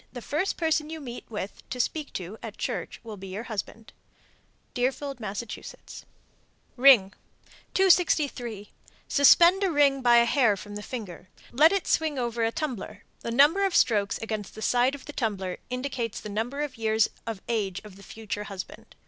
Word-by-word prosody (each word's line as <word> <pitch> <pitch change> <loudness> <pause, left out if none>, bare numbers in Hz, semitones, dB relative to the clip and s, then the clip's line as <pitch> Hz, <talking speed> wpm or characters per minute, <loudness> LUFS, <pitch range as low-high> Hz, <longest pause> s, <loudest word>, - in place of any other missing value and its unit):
The 250 - -7
first 305 - -2
person 315 -2 0
you 320 0 -6
meet 245 -4 -8
with, 205 -3 -6
to 250 - -5
speak 300 +4 -2
to, 190 +4 -6
at 220 -2 -8
church - - -4
will 220 -3 -8
be 195 0 -9
your 195 +4 -5
husband. 220 0 -6 0.8
Deerfield, 270 +2 -2
Mass. 210 0 -4 1.3
RING. 245 -7 +6 0.6
263. 290 - +2 0.4
Suspend 340 +7 +6
a 385 - +2
ring 285 -4 +3
by 240 -1 +6
a 235 - +6
hair 235 -5 +3
from 205 +2 -9
the 210 - -6
finger. 205 -6 -8 0.2
Let 300 +6 +6
it 395 -2 0
swing 315 -3 +1
over 235 -2 -1
a 225 - +1
tumbler. 235 -8 -5 0.2
The - - -5
number 290 +11 +4
of 390 -3 +1
strokes 205 -3 +3
against 215 -3 -5
the 220 - -7
side 250 +3 +2
of 280 - -12
the 295 - -8
tumbler 195 -8 -2
indicates 250 -3 -3
the 210 - -8
number 230 +7 -3
of 285 -4 -4
years 220 0 +2 0.2
of 220 -4 -5
age 200 -5 -1
of 210 -3 -12
the 200 - -15
future 210 0 -6
husband. 195 -3 -9
235 Hz, 175 wpm, -27 LUFS, 210-285 Hz, 1.3 s, RING